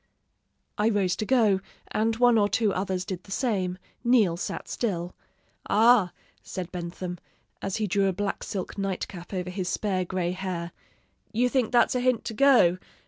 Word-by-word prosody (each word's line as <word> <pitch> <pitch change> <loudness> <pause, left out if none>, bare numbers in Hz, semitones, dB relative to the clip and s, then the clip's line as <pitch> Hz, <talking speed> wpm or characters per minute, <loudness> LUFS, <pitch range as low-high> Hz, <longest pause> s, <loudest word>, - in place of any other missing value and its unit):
"I 210 +2 +3
rose 195 -4 +1
to 215 - -3
go, 220 -7 +4 0.3
and 225 +1 +1
one 240 -1 +5
or 205 0 +3
two 215 -2 +1
others 185 -1 -2
did 185 -3 -5
the 195 - -14
same; 190 -6 -1 0.3
Neal 230 -8 +4
sat 175 - -5
still. 180 -6 -2 0.6
'Ah!' 220 -4 +5 0.3
said 180 -2 -6
Bentham, 175 0 -5 0.4
as 195 - -2
he 215 - 0
drew 200 0 +2
a - - +2
black 205 +2 -3
silk 195 0 -5
night 195 -1 -2
cap 175 -2 -10
over 180 -2 -3
his 185 -1 -3
spare 190 -3 0
gray 180 -1 -2
hair, 180 -2 -4 0.6
'you 240 +3 +2
think 250 -3 +1
that's 240 - +4
a 250 - +1
hint 250 -2 +1
to - - -4
go. 220 -9 +5
195 Hz, 175 wpm, -27 LUFS, 180-225 Hz, 0.6 s, one